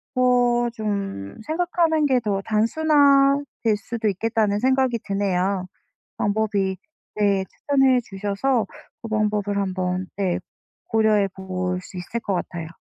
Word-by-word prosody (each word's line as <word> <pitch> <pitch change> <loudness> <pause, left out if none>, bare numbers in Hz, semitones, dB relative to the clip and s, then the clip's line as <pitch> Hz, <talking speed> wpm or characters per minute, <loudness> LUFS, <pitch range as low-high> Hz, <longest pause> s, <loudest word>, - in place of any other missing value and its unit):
어 245 -1 +3
좀 200 - -4
생각하는 330 -1 +1
게 260 -3 +3
더 205 -4 -1
단순화될 275 0 +3
수도 220 +1 -2
있겠다는 210 +1 0
생각이 260 -1 +2
드네요. 195 -1 0 0.5
방법이 205 -2 0 0.4
네 200 -2 +2
추천해 270 -3 +2
주셔서 205 +4 -1 0.4
그 230 - -6
방법을 210 -2 0
한번 185 -1 -2
네 190 -3 0 0.5
고려해 215 -3 +3
볼 185 -1 -3
수 185 - -13
있을 200 +6 -4
것 200 - -2
같아요. 170 -2 -4
215 Hz, 245 characters per minute, -23 LUFS, 195-250 Hz, 0.5 s, 어